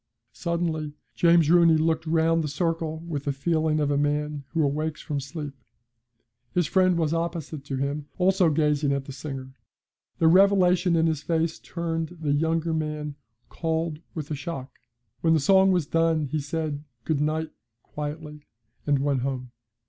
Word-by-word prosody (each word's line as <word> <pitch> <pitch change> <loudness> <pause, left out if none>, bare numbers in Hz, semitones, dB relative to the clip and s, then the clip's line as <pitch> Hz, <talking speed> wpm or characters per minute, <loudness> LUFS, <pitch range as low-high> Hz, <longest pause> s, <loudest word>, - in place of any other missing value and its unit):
Suddenly 165 -3 -2 0.2
James 170 -2 +4
Rooney 170 -2 +6
looked 160 0 0
round 165 0 +2
the - - -2
circle 160 +1 -2
with 145 -4 -4
the 145 - +1
feeling 155 +2 0
of 145 -1 +1
a 140 - +2
man 145 0 -1
who 160 +2 0
awakes 155 +2 -1
from 145 -2 -3
sleep. 145 +1 -6 1.0
His 175 -2 +3
friend 185 +1 +3
was 160 -2 +1
opposite 165 -3 -3
to 140 - -3
him, 140 +2 -2
also 185 -1 +3
gazing 150 -2 +2
at 140 -1 -2
the 140 - -8
singer; 135 -1 -7 0.6
the 165 - +3
revelation 180 -1 +5
in 165 0 +3
his 160 -3 0
face 165 0 -1
turned 165 0 -4
the 150 -3 0
younger 160 +2 +1
man 150 -1 -3 0.3
cold 160 -1 -2 0.2
with 155 -3 -5
the 150 - -2
shock. 140 -2 -7 0.4
When 165 -1 +3
the - - +3
song 190 +5 +5
was 175 -5 +2
done 165 0 +2
he 150 +3 -2
said 150 0 -3 0.2
'good 145 +2 0
night' 155 +1 -1 0.3
quietly, 150 0 -7 0.4
and 145 -1 +3
went 140 -3 +1
home. 130 -1 -3
155 Hz, 165 wpm, -26 LUFS, 145-165 Hz, 1.0 s, Rooney